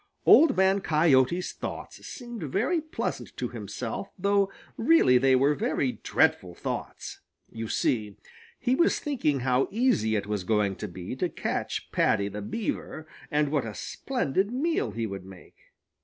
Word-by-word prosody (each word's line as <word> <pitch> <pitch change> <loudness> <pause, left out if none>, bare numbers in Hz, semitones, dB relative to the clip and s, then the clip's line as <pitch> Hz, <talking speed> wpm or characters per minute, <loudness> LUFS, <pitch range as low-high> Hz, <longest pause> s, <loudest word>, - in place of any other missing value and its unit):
Old 305 -4 +7
Man 190 +1 +3
Coyote's 155 0 +3
thoughts - - -7
seemed 240 -3 -8
very 215 - 0
pleasant 315 +1 -5
to - - -2
himself, - - -5
though 200 +1 +2 0.2
really 230 - +5
they 135 0 +4
were 140 +3 +4
very 130 -2 -1
dreadful 90 -2 +1
thoughts. - - -5 0.3
You 115 0 -5
see, 105 -3 -1 0.4
he 250 0 +1
was 335 +6 +3
thinking 155 - -1
how 130 +1 +2
easy 200 - +2
it 100 -2 -1
was 105 -2 -2
going 105 -1 +1
to 105 - -5
be 90 +4 -7
to 180 - 0
catch - - -3
Paddy 100 -2 +2
the 105 +1 -6
Beaver, 160 - -4 0.2
and 150 -2 +1
what 145 -3 +1
a 110 -2 -6
splendid 205 - -2
meal 315 +7 0
he 115 0 -3
would 100 -3 -6
make. 95 -1 -14
140 Hz, 155 wpm, -27 LUFS, -, 0.4 s, Old